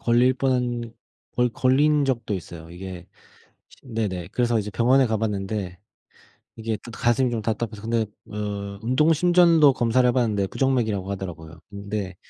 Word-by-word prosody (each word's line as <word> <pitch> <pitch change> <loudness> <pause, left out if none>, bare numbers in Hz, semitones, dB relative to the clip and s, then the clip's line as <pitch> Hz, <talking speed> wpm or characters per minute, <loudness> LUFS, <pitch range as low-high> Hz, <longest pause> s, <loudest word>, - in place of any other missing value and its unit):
걸릴 120 +2 +3
뻔한 125 -3 -1 0.4
거의 125 0 +2
걸린 145 +4 +3
적도 115 -6 -1
있어요. 85 -2 -8
이게 90 0 -8 0.8
네네. 105 -8 -3
그래서 120 -2 +1
이제 105 0 -3
병원에 125 +4 +3
가 110 - 0
봤는데 100 -3 -3 0.8
이게 110 -1 -3
또 120 - -8
가슴이 120 +3 +1
좀 115 - -2
답답해서 110 -1 -3
근데 115 0 0 0.3
어 100 -1 -5
운동 130 +8 +3
심전도 170 -3 +5
검사를 125 +1 +2
해 - - +4
봤는데 110 -6 +1
부정맥이라고 110 -8 0
하더라고요. 85 -4 -7
근데 100 -2 -5
115 Hz, 330 characters per minute, -24 LUFS, 100-125 Hz, 0.8 s, 심전도